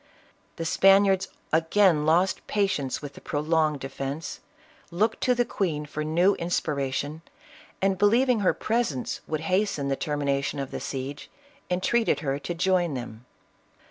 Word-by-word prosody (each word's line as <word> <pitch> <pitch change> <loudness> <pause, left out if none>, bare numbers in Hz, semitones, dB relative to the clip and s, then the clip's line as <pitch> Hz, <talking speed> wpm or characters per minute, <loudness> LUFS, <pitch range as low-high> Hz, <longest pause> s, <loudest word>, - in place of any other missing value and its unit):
The 165 - -4
Spaniards 195 +2 +4 0.3
again 165 -1 +3
lost 175 +4 +2
patience 190 -11 -1
with 145 -1 -7
the - - -13
pro 145 - -3
longed 155 -2 +1
defence, 135 +3 -5 0.5
looked 215 +6 0
to 250 - +3
the 245 0 +2
queen 165 -9 -2
for 155 +1 -4
new 175 +6 +3
inspira 150 -5 -1
tion, 145 +4 -3 0.6
and 195 -1 +2
believing 235 +4 +4
her 195 - +2
presence 220 - -1
would 155 -1 -2
hasten 185 -5 0
the 135 - +1
termination 145 -1 -1
of 135 -1 -4
the - - -4
siege, 135 +2 -5 0.4
entreated 200 +6 +1
her 140 -2 -1
to 175 +4 -5
join 175 -3 +1
them. 120 -1 -8
160 Hz, 145 wpm, -26 LUFS, 145-195 Hz, 0.6 s, Spaniards